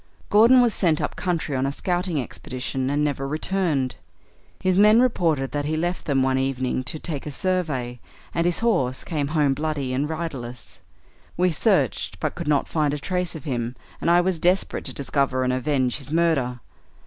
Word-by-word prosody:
Gordon 230 +5 +7
was 235 -3 +2
sent 165 -5 +2
up - - -2
the - - -8
country 170 -5 -1
on 130 +1 0
a - - -1
scouting 175 +1 -1
expedition, 130 +1 -4
and 145 +1 +1
never 140 -2 -1
returned. 155 -4 -1 0.6
His 185 -1 +1
men 210 +3 +6
reported 165 - +1
that 145 -1 -2
he 155 +2 -1
left 175 +3 -2
them 135 -3 +2
one 130 0 +2
evening 130 -1 -1
to 145 - -3
take 150 -2 -5
a - - -2
survey, 145 -8 -2 0.3
and 170 +1 +1
his 175 - 0
horse 135 - +1
came 150 -4 -2
home 150 -2 +2
bloody 145 -3 -2
and 140 +4 -1
riderless. 140 -7 -6 0.6
We 180 +1 +3
searched, 155 - +1
but - - -1
could - - -6
not 145 -2 +2
find 150 -3 0
a - - -3
trace 180 +3 -2
of 155 - -7
him, 120 -3 -3 0.3
and - - +1
I 175 +1 +6
was 180 -2 0
desperate 180 +3 +1
to - - -4
discover 135 -2 0
and 125 0 +1
avenge 130 -1 0
his 140 +1 -6
murder. 150 -7 +1
150 Hz, 190 wpm, -24 LUFS, 130-175 Hz, 0.6 s, Gordon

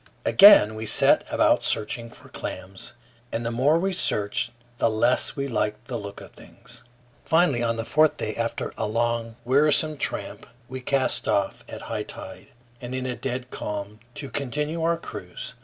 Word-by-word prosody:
Again 195 - +8
we 110 0 -6
set - - +5
about - - +3
searching 115 +2 -1
for - - -16
claims, 95 +1 -8 0.4
and 115 +1 -3
the 115 - -1
more 135 +7 +3
we 190 +3 -1
searched 105 - 0 0.3
the 115 - +3
less 120 +5 +1
we 140 -1 -3
liked 105 -2 -2
the 125 - -6
look 100 0 -9
of - - -12
things. - - -14 0.4
Finally, 160 -7 +2
on 115 -1 0
the 115 0 -4
fourth 155 +4 +3
day, 110 - -3
after 115 0 -3
a - - -1
long, 115 +1 -1
wearisome 150 +3 +4
tramp, - - -2 0.2
we 130 0 -7
cast 135 +1 0
off 100 -1 0
at - - -8
high - - -4
tide, - - -9 0.3
and 125 +1 -6
in 130 0 -3
a 125 -1 -3
dead 125 -1 -5
calm, 105 +1 -6 0.2
to 145 -1 -6
continue 150 +4 -3
our 165 0 +1
cruise. - - -7
120 Hz, 175 wpm, -24 LUFS, 110-145 Hz, 0.4 s, Again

